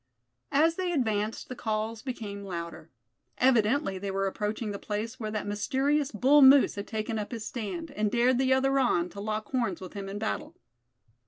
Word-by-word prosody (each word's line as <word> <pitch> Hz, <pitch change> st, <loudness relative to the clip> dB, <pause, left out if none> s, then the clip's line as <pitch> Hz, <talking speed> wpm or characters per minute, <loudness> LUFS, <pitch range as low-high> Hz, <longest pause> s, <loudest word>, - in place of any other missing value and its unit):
As 320 Hz, +4 st, +3 dB
they 365 Hz, -1 st, -1 dB
advanced, 220 Hz, -7 st, -1 dB
the 255 Hz, -, -6 dB
calls 220 Hz, -1 st, -2 dB
became 210 Hz, -6 st, -6 dB
louder. 170 Hz, -3 st, -6 dB, 0.5 s
Evidently 240 Hz, -3 st, +2 dB
they 200 Hz, +1 st, -4 dB
were 195 Hz, 0 st, -1 dB
approaching 210 Hz, +2 st, -2 dB
the 200 Hz, -, -5 dB
place 225 Hz, +4 st, -4 dB
where 215 Hz, -2 st, -3 dB
that 215 Hz, -1 st, -3 dB
mysterious 265 Hz, +8 st, 0 dB
bull 270 Hz, +7 st, +5 dB
moose 275 Hz, +1 st, +7 dB
had 200 Hz, 0 st, -6 dB
taken 220 Hz, 0 st, -3 dB
up 205 Hz, -, -5 dB
his 225 Hz, -3 st, -5 dB
stand, 280 Hz, +9 st, -5 dB
and 215 Hz, -5 st, 0 dB
dared 240 Hz, +3 st, +3 dB
the 265 Hz, 0 st, +2 dB
other 270 Hz, +1 st, +3 dB
on, 180 Hz, -9 st, +2 dB
to 200 Hz, -, -10 dB
lock 215 Hz, 0 st, -3 dB
horns 250 Hz, -3 st, 0 dB
with 185 Hz, -3 st, -9 dB
him 195 Hz, -1 st, -6 dB
in 200 Hz, -, -5 dB
battle. 215 Hz, +1 st, -3 dB
220 Hz, 185 wpm, -28 LUFS, 205-265 Hz, 0.5 s, moose